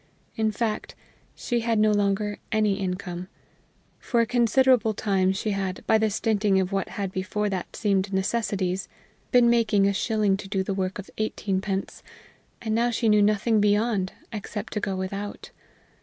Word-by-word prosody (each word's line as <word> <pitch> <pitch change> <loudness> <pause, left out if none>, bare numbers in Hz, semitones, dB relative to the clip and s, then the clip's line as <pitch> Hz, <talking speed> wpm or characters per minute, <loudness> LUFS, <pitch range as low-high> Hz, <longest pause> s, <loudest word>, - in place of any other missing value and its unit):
In 220 -1 +1
fact, 215 0 -3 0.4
she 240 -1 -1
had 230 -1 0
no 215 0 +4
longer 205 0 0
any 215 -2 +2
income. 180 -1 -4 0.7
For 240 - 0
a - - +2
considerable 240 -1 +3
time 190 -3 +1
she 205 +3 -2
had, 190 -2 -3
by 220 - +4
the 220 0 +2
stinting 205 -2 +1
of 190 0 -1
what 195 -1 -1
had 195 -2 -2
before 190 +3 -2
that 185 -2 -4
seemed 200 -2 0
necessities, 190 -2 -1 0.4
been 245 -2 +6
making 225 -4 +3
a 200 - +2
shilling 210 -1 +1
do 195 -1 -2
the 195 - -2
work 190 0 -2
of 200 - -9
eighteenpence, 195 -2 -2 0.6
and 220 -1 -1
now 235 +2 +2
she 230 -1 +1
knew 210 0 +5
nothing 215 +1 +3
beyond, 205 -2 +1 0.2
except 210 +1 -5
to 210 - -1
go 195 -2 -2
without. 195 +2 -5
205 Hz, 160 wpm, -25 LUFS, 195-220 Hz, 0.7 s, been